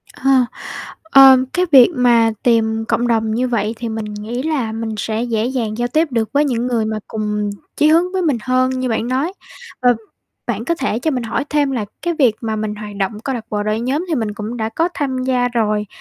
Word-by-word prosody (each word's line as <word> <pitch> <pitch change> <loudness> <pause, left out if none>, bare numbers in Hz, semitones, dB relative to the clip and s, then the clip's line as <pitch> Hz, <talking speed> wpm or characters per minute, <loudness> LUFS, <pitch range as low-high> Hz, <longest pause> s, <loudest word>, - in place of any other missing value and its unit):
Ờ, 270 +1 0 0.7
ờ, 270 -4 +8 0.2
cái 365 0 +2
việc 260 -4 +8
mà 235 -3 +4
tìm 225 -2 +2
cộng 240 +1 +1
đồng 225 -2 +1
như 250 +3 0
vậy 225 -3 -1
thì 235 0 -4
mình 220 -1 -4
nghĩ 220 +5 -5
là 285 -8 -1
mình 220 0 -4
sẽ 220 +2 -2
dễ 225 -2 -1
dàng 235 -4 -2
giao 240 0 0
tiếp 310 +7 +1
được 230 -3 0
với 290 +1 +3
những 245 -3 -1
người 235 -3 0
mà 215 0 -2
cùng 210 -1 -2 0.3
chí 300 - +3
hướng 335 +4 +3
với 375 - 0
mình 300 -8 +1
hơn, 255 0 +2
như 255 -1 -1
bạn 225 0 -1
nói. 270 +8 -1 0.5
Ờ, 245 -1 +4 0.5
bạn 230 -2 -2
có 335 - 0
thể 265 -8 -2
cho 315 +6 -1
mình 255 -4 -2
hỏi 230 +4 -2
thêm 290 -2 +1
là 240 -5 -2 0.2
cái 345 0 -1
việc 260 -8 +3
mà 220 -2 -2
mình 215 -1 -3
hoạt 210 -1 -8
động 205 +2 -2
câu 270 - -2
lạc 230 -3 -5
bộ, 210 -1 -1
đội 215 +1 -1
nhóm 270 +8 -1
thì 330 - 0
mình 220 -6 -2
cũng 215 +3 -5
đã 220 -2 -2
có 330 +9 0
tham 260 -3 -2
gia 250 -1 +1
rồi 215 -3 0
240 Hz, 230 wpm, -18 LUFS, 220-265 Hz, 0.7 s, ờ